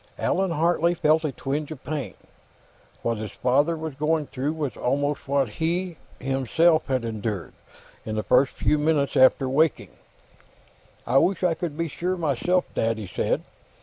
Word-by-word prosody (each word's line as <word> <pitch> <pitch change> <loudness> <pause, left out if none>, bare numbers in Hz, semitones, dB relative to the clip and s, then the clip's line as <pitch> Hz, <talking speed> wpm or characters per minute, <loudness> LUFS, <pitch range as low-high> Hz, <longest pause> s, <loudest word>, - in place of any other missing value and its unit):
Allan 190 +1 0
Hartley 170 +1 +2
felt 160 0 +3
a 150 - 0
twinge 140 +3 -3
of 155 -5 -9
pain. 140 - -4 0.9
What 115 -1 0
his 110 -1 -4
father 145 +6 +2
was 160 -1 -5
going 150 +2 0
through 140 +3 -3
was 145 -7 -3
almost 145 +3 -1
what 140 -1 +2
he, 170 - -2 0.2
himself, 135 +5 +2
had 130 -3 0
endured, 110 -4 -4 0.5
in 110 - -4
the 110 - -1
first 130 +2 +3
few 150 - +1
minutes 150 -2 +1
after 130 +1 +5
waking. 150 +4 +1 1.1
"I 130 +3 +4
wish 185 +3 +1
I 175 -2 +3
could 165 -3 -5
be 165 0 -1
sure, 180 +5 -2
myself, 175 +3 +1
Dad," 115 0 0
he 110 - -5
said. 90 - -1
145 Hz, 160 wpm, -25 LUFS, 130-160 Hz, 1.1 s, after